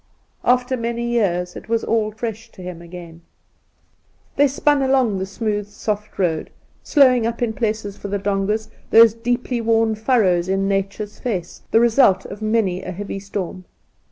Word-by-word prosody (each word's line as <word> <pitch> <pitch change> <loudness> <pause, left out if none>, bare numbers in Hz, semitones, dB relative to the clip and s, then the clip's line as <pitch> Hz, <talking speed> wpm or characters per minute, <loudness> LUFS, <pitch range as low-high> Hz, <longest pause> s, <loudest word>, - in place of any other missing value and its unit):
After 250 +1 +2
many 235 0 -3
years 180 -7 0
it - - -10
was 230 0 +1
all 220 -2 +1
fresh 225 +1 -6
to 185 - -11
him 180 -2 -7
again. 170 -1 -11 1.1
They 285 - +5
spun 285 +1 +2
along 260 -7 +2
the 190 - -3
smooth 210 0 -2
soft 210 0 -4
road, 165 -5 0 0.3
slowing 255 -6 +4
up 235 +1 -2
in 225 -2 0
places 215 -3 -2
for - - -7
the 200 0 -1
dongas 205 +2 -1
— - - -31
those 225 -1 +7
deeply 240 +1 -2
worn 225 -1 +2
furrows 210 -6 +2
in 195 0 +1
Nature's 200 +1 -2
face, 185 -8 -4
the 225 - +4
result 230 -5 +4
of 200 +2 -8
many 215 -4 +1
a - - -6
heavy 195 +1 -5
storm. 190 -2 -5
215 Hz, 165 wpm, -21 LUFS, 195-235 Hz, 1.1 s, those